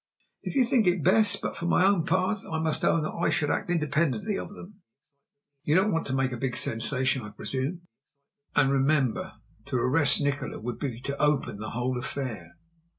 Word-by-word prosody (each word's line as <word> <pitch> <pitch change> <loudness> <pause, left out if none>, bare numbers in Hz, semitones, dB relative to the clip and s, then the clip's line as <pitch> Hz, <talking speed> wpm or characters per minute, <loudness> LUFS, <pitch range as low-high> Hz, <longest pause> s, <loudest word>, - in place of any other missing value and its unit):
"If - - -6
you 260 -2 +4
think 235 -5 +2
it 175 -3 +2
best; 205 +2 +4
but, - - -3
for 170 - -4
my 180 - +3
own 195 -4 +2
part, 185 +4 +1
I 160 - -1
must 160 -1 0
own 160 -2 +2
I 170 - -1
should 145 - 0
act - - -2
independently 170 +5 0
of - - -5
them. 205 0 -13 0.8
You 150 +1 +1
don't 195 +3 +3
want 165 - -1
to 130 - -2
make 135 -1 0
a 125 - -4
big 125 +1 -2
sensation, 130 +3 +1
I 105 - -8
presume; 135 - -4 0.7
and 140 -2 +4
remember, 135 -5 +1 0.3
to 140 - -4
arrest 140 +5 +4
Nikola 145 0 -2
would 120 +1 -5
be 125 -5 -4
to 140 +2 -4
open 145 -8 +1
the 110 - -5
whole 125 +1 -2
affair." 115 -10 -5
145 Hz, 190 wpm, -27 LUFS, 130-175 Hz, 0.8 s, you